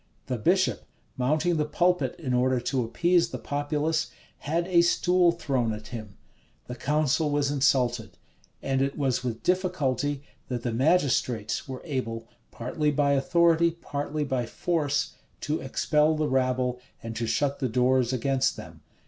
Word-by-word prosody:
The 125 -2 -3
bishop, 185 - +1 0.3
mounting 155 +7 +1
the 150 - +1
pulpit 180 +4 +1
in 140 -7 -3
order 125 +1 +2
to 125 +1 -1
appease 170 +8 +2
the - - -5
populace, 150 +2 -1 0.3
had 165 +4 -1
a 175 -2 +5
stool 175 +1 +3
thrown 135 -9 -1
at 105 +1 -8
him; 110 -4 -8 0.5
the 125 - -6
council 150 +3 +1
was 145 -1 +1
insulted: 125 -4 +1 0.5
and 135 -1 0
it 135 +1 -1
was 135 -4 0
with 120 -2 -4
difficulty 145 -7 0 0.2
that 120 -2 -4
the 120 - -2
magistrates 125 -6 +1
were 130 -1 -7
able, 115 -7 -4 0.2
partly 150 +6 -2
by 145 -1 +2
authority, 170 +3 +3
partly 150 -2 -4
by 130 -4 -2
force, 145 -1 -1 0.3
to 150 +1 -2
expel 150 +3 +2
the 155 0 0
rabble, 130 -1 0 0.2
and 115 0 -6
to 115 0 -2
shut 140 +3 0
the 130 - -1
doors 125 +1 +2
against 130 +1 0
them. - - -11
140 Hz, 150 wpm, -27 LUFS, 125-155 Hz, 0.5 s, a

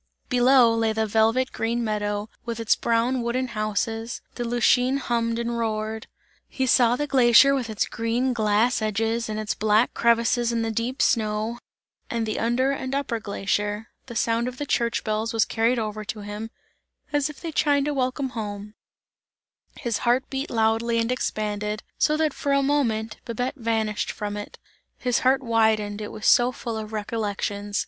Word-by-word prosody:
Below 250 -1 +5
lay 225 -1 +1
the 220 0 0
velvet 225 +5 +2
green 235 +1 -1
meadow, 205 -1 -2 0.2
with 235 -1 -4
its 225 -1 +3
brown 235 +2 +1
wooden 250 +2 -1
houses, 225 +1 -2
the 240 - -4
Lütschine 245 +2 +2
hummed 230 -3 -1
and 235 0 -2
roared. 220 0 -2 0.4
He 265 - -2
saw 245 -1 +4
the 295 - -1
glacier 265 0 +6
with 255 -4 -1
its 215 - 0
green 235 +3 -1
glass 220 +2 +2
edges 225 +2 -1
and 215 0 -3
its 215 -1 -2
black 215 +2 +2
crevices 235 0 +2
in 230 -1 0
the 225 - -1
deep 235 +5 -1
snow, 220 +1 0 0.5
and 230 -1 -1
the 215 - -2
under 240 +4 +1
and 265 -1 -3
upper 265 -5 -1
glacier. 205 +1 -2 0.2
The 235 - -8
sound 230 +1 +1
of 250 0 -6
the 290 - -3
church 235 -3 0
bells 220 +1 -1
was 225 -3 +3
carried 230 +3 +1
over 215 -1 -3
to 215 0 -5
him, 210 +2 -6 0.6
as 290 0 +1
if 300 - -10
they 330 - -5
chimed 285 -2 +2
a 295 - 0
welcome 260 0 -1
home; 210 -3 -6 1.0
his 235 -7 -2
heart 250 +2 +1
beat 270 +1 -3
loudly 225 +1 +1
and 230 +1 +1
expanded, 210 -3 -2 0.2
so, 305 - +3
that 310 -2 +1
for 280 - -1
a 275 0 +3
moment, 230 -6 0
Babette 245 +2 -2
vanished 225 -4 -1
from 205 0 -5
it; 205 0 -7 0.4
his 250 -2 0
heart 265 +1 +2
widened, 220 -3 +1
it 210 - -5
was 215 - -7
so 245 +1 +5
full 235 -2 -5
of 215 0 -7
recollections. 205 -1 -3
230 Hz, 175 wpm, -24 LUFS, 215-250 Hz, 1.0 s, glacier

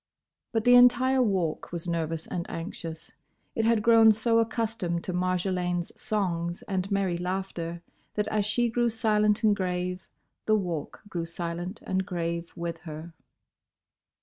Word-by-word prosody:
But 225 -1 0
the 245 - +6
entire 250 +2 +6
Walk 190 -9 0
was 170 0 -4
nervous 165 -1 -2
and 170 -1 -4
anxious. 165 -2 -7 0.4
It 225 - 0
had 225 -2 +3
grown 225 -1 +7
so 230 +2 +2
accustomed 220 -7 -1
to 185 - -4
Marjolaine's 180 -1 -1
songs 175 -5 -2
and 190 -1 -2
merry 190 -3 +1
laughter, 175 -2 -4 0.3
that 210 0 0
as 215 -1 +1
she 225 +4 +1
grew 240 +1 +1
silent 215 -1 +2
and 210 -1 +5
grave, 180 -1 -2 0.4
the 215 - +5
Walk 175 -7 -3
grew 170 -5 -4
silent 175 +4 -4
and 190 0 0
grave 170 -2 -3
with 170 -1 -4
her. 160 +1 -8
185 Hz, 145 wpm, -28 LUFS, 170-220 Hz, 0.4 s, grown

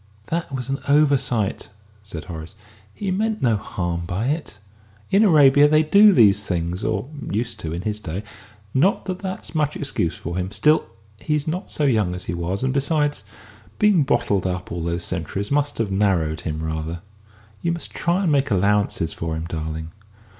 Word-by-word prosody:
"That 165 -2 -2
was 130 -2 -4
an 135 0 -2
oversight," 135 -8 +2 0.3
said 90 -6 -8
Horace; 85 +1 -8 0.4
"he 195 - -4
meant 215 +3 -1
no 115 -3 +4
harm 85 -4 -3
by 100 +8 -1
it. 150 -8 -3 0.5
In 200 +3 +5
Arabia 145 -6 +6
they 155 +1 +4
do 200 +7 +7
these 105 - +5
things 90 -1 -2
or - - -1 0.2
used 115 +1 -2
to 80 -7 -5
in 85 +2 -4
his 105 0 -2
day. 90 +1 -5 0.5
Not 185 - +2
that 185 -1 -4
that's 190 -3 -6
much 150 -2 0
excuse 135 - -1
for 85 +2 -5
him. 90 0 -2
Still, 130 +11 +2 0.3
he's 150 +2 -1
not 175 +4 -3
so 150 - -2
young 110 -10 +2
as 90 - -3
he - - -4
was, 85 +5 -2
and 130 0 +1
besides, 145 -3 +1 0.5
being 210 -5 +4
bottled 100 -8 +1
up 90 0 -4
for - - -5
all 85 - -3
those 85 +1 -2
centuries 95 - -3
must 145 0 +1
have 110 -4 -1
narrowed 95 -6 +1
him 80 0 -4
rather. 80 +1 -4 0.6
You 170 - 0
must 170 -1 -5
try 175 +3 0
and 170 - +2
make 140 -1 +2
allowances 100 -4 +1
for 80 -1 -3
him, 80 +1 -4
darling." 80 -1 -5
105 Hz, 180 wpm, -22 LUFS, -, 0.6 s, do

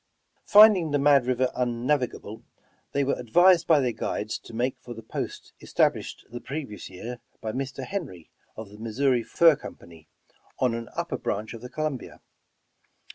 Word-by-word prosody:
Finding 205 -6 +7
the 145 - +1
Mad 140 -3 +4
River 130 0 +1
unnavigable, 125 -2 -2 0.5
they 140 - +1
were 140 - -1
ad 120 - -9
vised 175 +5 +5
by 160 -3 +5
their 125 -3 +1
guides 110 -1 -3
to - - -14
make 120 +3 -1
for 120 - -9
the 115 - -10
post - - -6
established - - 0
the 120 0 -7
previous 130 - -6
year 115 +6 -8 0.2
by 110 - -4
Mr. 130 +1 -5
Henry, 135 - -6 0.3
of 110 -2 -8
the 105 +1 -14
Missouri 120 +3 +1
Fur 165 +7 +4
Company, 80 - -12 0.5
on 125 -2 +1
an 115 -1 -5
upper - - -3
branch 110 +3 -3
of 115 - -9
the 125 - -8
Columbia. 150 -1 -4
125 Hz, 165 wpm, -26 LUFS, 115-145 Hz, 0.5 s, Finding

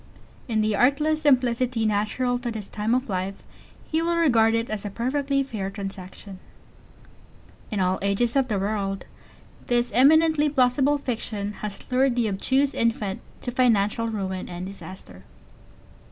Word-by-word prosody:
In 220 -3 +1
the 215 -1 +1
artless 300 +7 +2
simplicity 255 -4 +2
natural 215 +4 0
to 245 -1 -4
this 215 -3 -5
time 215 +3 -1
of 255 +1 -1
life, 190 0 -3 0.4
he 320 +1 -1
will 340 +1 0
regard 230 -9 +4
it 230 +1 0
as 215 -2 -4
a 205 - -4
perfectly 275 +5 0
fair 215 -7 -4
transaction. 195 -1 -8 1.3
In 210 - -2
all 185 0 +1
ages 200 +5 0
of 270 -2 +3
the 215 -5 -1
world 195 -1 -2 0.6
this 240 0 +1
eminently 305 +3 +5
plausible 275 +1 +3
fiction 220 -6 -4
has 210 -2 -6
lured 255 0 +3
the 240 -2 +1
obtuse 265 +8 +1
infant 220 -4 -1 0.2
to 245 - -3
financial 230 -3 +2
ruin 190 -4 -4
and 175 +1 -6
disaster. 185 - -10
230 Hz, 145 wpm, -25 LUFS, 200-260 Hz, 1.3 s, eminently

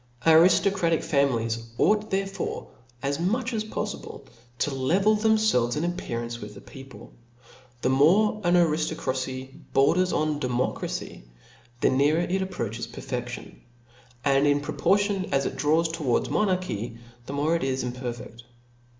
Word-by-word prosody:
Ariftocratical 170 +1 +4
families 115 -5 0
ought 215 0 +2
therefore, 195 0 -3 0.3
as 140 +2 -1
mdch 230 +8 0
as 215 -1 -1
poffible, 210 -1 -6 0.3
to 145 - -1
level 185 +11 +2
themfelves 215 - +2
in 150 - -1
appearance 120 -9 -4
with 105 0 -9
the - - -10
people. 135 -2 -13 0.7
The 130 - +2
more 195 +11 +4
an 175 0 +3
ariftocracy 145 -6 0 0.2
borders 175 +7 +3
on 155 -1 0
democracy, 125 - -3 0.6
the - - +4
nearer 145 +5 +3
it 185 +2 -1
approaches 115 - -4
to 120 - -10
pcrfeftion: 120 -2 -6 0.7
and, 140 +1 +4
in 145 0 +3
proportion 195 +5 0
as 135 -1 +1
it - - -3
draws 155 +5 +2
towards 155 -7 -1
monarchy, 180 - -1 0.3
the 135 - -5
more 150 +4 +1
it 165 - -1
is 130 -1 -1
impcrfeft. 120 -1 -6
145 Hz, 135 wpm, -26 LUFS, 130-185 Hz, 0.7 s, Ariftocratical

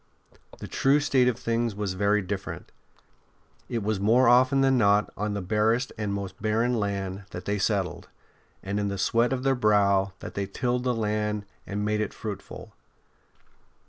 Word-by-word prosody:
The - - -8
true 140 +2 +3
state 135 -3 +2
of 125 - +1
things 115 -2 -1
was 100 -2 -2
very 100 +2 +1
different. 95 +1 -6 1.0
It 115 -4 -2
was 105 -1 -1
more 115 +5 +4
often 130 +3 +5
than 135 -1 +4
not 105 -3 +3
on 105 +1 -2
the 100 - -3
barest 110 +5 +1
and 105 -2 -3
most 100 -1 -5
barren 110 +3 +1
land 100 -1 -3
that 90 - -8
they 100 0 -1
settled, 95 -2 -1 0.5
and 100 +2 -2
in 100 - 0
the 100 0 -3
sweat 115 +5 +2
of 130 -1 -2
their 135 0 +3
brow 100 -5 +2
that - - -8
they 100 -1 -3
tilled 125 +4 -2
the 125 -1 +1
land 105 -1 -1 0.2
and 105 +1 -2
made 105 0 0
it 110 - -3
fruitful. 105 -3 -7
105 Hz, 175 wpm, -26 LUFS, 100-120 Hz, 1.0 s, often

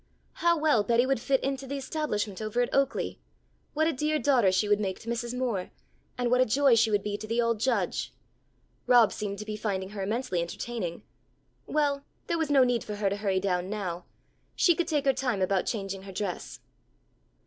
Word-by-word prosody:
How 340 0 +2
well 300 -8 +3
Betty 235 +4 +3
would 270 -2 +1
fit 270 +2 +1
into 270 0 -2
the 280 +2 -3
establishment 225 -9 -3
over 215 +3 -1
at - - -4
Oaklea. 275 -1 0 0.6
What 315 +1 +3
a 325 - +1
dear 300 +3 0
daughter 255 -10 +3
she 190 +3 +1
would 205 0 +3
make 190 -3 -2
to 230 - -14
Mrs. 235 +1 -3
Moore, 230 -8 -1 0.5
and 245 -1 0
what 250 0 +4
a - - +5
joy 270 +3 +4
she 225 -1 +4
would 205 -2 +1
be 205 -1 -2
to 215 - -7
the 230 +2 -1
old 230 -2 +1
Judge! 260 +4 0 0.8
Rob 240 -4 +6
seemed 200 -2 -4
to 210 - -6
be 215 0 -4
finding 195 -3 -3
her 205 -1 -6
immensely 210 -2 -1
entertaining. 175 0 -4 0.6
Well, 285 -2 +1 0.2
there 335 -1 -1
was 320 -2 0
no 275 -3 +6
need 245 -2 +1
for 210 - -5
her 205 -1 0
to 200 - -1
hurry 195 -2 0
down 185 -1 -1
now. 185 -5 -4 0.5
She 345 - +5
could 335 0 -1
take 295 -4 0
her 270 - +4
time 250 -6 -1
about 190 0 +1
changing 195 -3 -3
her 195 0 -9
dress. 190 -1 -5
230 Hz, 205 wpm, -28 LUFS, 200-270 Hz, 0.8 s, Rob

